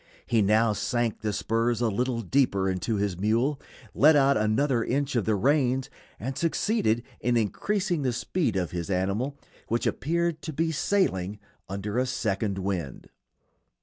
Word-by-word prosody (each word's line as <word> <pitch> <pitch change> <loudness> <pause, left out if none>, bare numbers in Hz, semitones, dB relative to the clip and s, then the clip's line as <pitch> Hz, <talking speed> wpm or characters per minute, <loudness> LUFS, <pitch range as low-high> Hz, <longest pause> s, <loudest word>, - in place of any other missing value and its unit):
He 115 -2 +2
now 110 +2 +3
sank 120 +1 -1
the 105 - -1
spurs 115 +3 0
a 120 - +2
little 120 +3 -1
deeper 100 -3 +2
into 95 +4 -1
his 100 -3 -1
mule, 120 +8 +1 0.3
let 155 +2 +6
out 140 -1 +4
another 115 +3 +1
inch 140 +1 -1
of 115 - +1
the 110 - +2
reins, 130 +3 +1 0.3
and 130 +5 -4
succeeded 160 - +1 0.2
in 120 -1 +1
increasing 175 - 0
the 130 -2 +1
speed 125 - -1
of 90 -3 -1
his 85 0 -4
animal, 100 +9 -1 0.3
which 115 +1 -1
appeared 170 +1 0
to 160 - -5
be 160 +3 0
sailing 105 - 0 0.3
under 100 +4 -2
a 130 - +1
second 105 -5 -1
wind. 95 -7 -4
115 Hz, 155 wpm, -27 LUFS, 100-140 Hz, 0.3 s, let